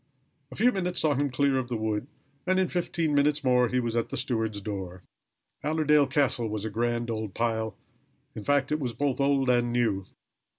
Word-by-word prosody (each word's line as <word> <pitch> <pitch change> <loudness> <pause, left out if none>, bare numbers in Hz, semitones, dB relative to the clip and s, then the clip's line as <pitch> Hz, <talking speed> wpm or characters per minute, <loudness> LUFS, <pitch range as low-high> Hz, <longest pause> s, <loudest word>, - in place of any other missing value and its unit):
A - - -8
few 245 +4 +4
minutes 180 -4 -2
saw 155 -2 +3
him 145 +1 0
clear 135 0 +2
of 125 - -4
the 120 -2 -2
wood, 110 +2 -2 0.4
and 185 0 +3
in 185 - +1
fifteen 170 -3 -1
minutes 145 +1 +2
more 125 -1 +4
he 125 +2 0
was 120 -2 -2
at 115 - 0
the - - -4
steward's 110 -5 -1
door. 95 -3 -6 0.6
Allerdale 150 -1 +3
Castle 130 -4 +1
was 105 0 -3
a 110 - -3
grand 120 +1 -1
old 110 -3 -4
pile. 110 -1 -1 0.6
In 110 - -7
fact 140 +3 +1
it 150 - +1
was 125 -5 -3
both 140 +1 -1
old 140 -1 +2
and 120 -1 +2
new. 110 -6 0
125 Hz, 200 wpm, -27 LUFS, 110-145 Hz, 0.6 s, few